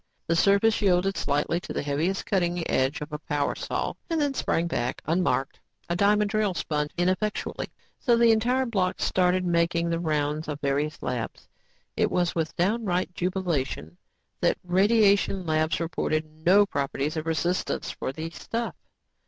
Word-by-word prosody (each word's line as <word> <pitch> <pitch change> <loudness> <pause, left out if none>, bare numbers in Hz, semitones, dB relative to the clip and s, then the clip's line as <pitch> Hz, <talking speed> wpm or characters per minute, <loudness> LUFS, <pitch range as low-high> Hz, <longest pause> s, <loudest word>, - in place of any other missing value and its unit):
The 165 - +1
surface 200 +6 +4
yielded 195 0 +2
slightly 150 +4 0
to - - -7
the - - -2
heaviest 155 +7 -1
cutting 175 -3 0
edge 135 +3 +1
of 150 +1 -6
a 150 - -3
power 145 -1 -1
saw - - -3 0.2
and 330 -1 0
then 290 -2 +1
sprang 170 -9 0
back, 125 -7 -2
unmarked. 165 -4 0 0.3
A - - +1
diamond 205 +2 +3
drill 215 -4 +1
spun 150 -2 -1
ineffectually. 185 +4 -1 0.3
So 240 -2 +3
the 230 -1 +6
entire 245 +4 +2
block 190 -6 0
started 185 0 +2
making 170 0 +1
the 165 - 0
rounds 150 -1 -1
of 150 -2 -4
the 140 - -2
various 150 +2 -1
labs. 125 -2 -4 0.5
It - - +2
was 175 -1 +1
with 160 -2 -2
downright 185 -1 0
jubilation 170 - -2 0.4
that - - +2
radiation 195 0 +3
labs 155 0 +1
reported 160 -1 -1
no 170 +6 +3
properties 140 -2 -2
of 155 0 -3
resistance 170 +3 -1
for - - -4
the 160 +4 -6
stuff. 230 +6 -4
175 Hz, 160 wpm, -26 LUFS, 155-195 Hz, 0.5 s, the